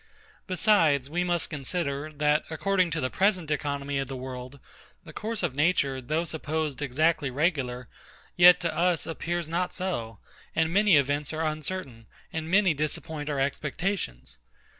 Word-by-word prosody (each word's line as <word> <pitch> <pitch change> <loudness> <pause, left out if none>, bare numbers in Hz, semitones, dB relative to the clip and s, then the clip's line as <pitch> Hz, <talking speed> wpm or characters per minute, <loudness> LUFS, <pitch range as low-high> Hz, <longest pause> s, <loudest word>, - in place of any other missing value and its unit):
Besides, 165 - +3
we 175 +2 0
must 175 -1 0
consider, 145 0 -2
that, 150 0 +2
according 185 +3 +1
to 160 -1 -2
the 130 - -1
present 185 -5 +1
economy 140 -1 -1
of 135 - -2
the 135 - -6
world, 130 +1 -7 0.4
the - - -12
course 220 0 -3
of - - 0
nature, 140 -3 +1
though 155 +7 -1
supposed 155 -3 -3
exactly 150 +2 +1
regular, 130 -4 -1 0.5
yet 180 0 +8
to 170 - -1
us 175 -1 +2
appears 170 +1 -3
not 175 +2 -2
so, 120 - -3 0.4
and 160 +1 +1
many 205 -2 +5
events 145 +2 0
are 160 +1 -1
uncertain, 155 -7 -4 0.3
and 160 0 -3
many 190 -1 +4
disappoint 150 0 -3
our 145 -2 -1
expectations. 135 - -3
155 Hz, 150 wpm, -27 LUFS, 140-175 Hz, 0.5 s, yet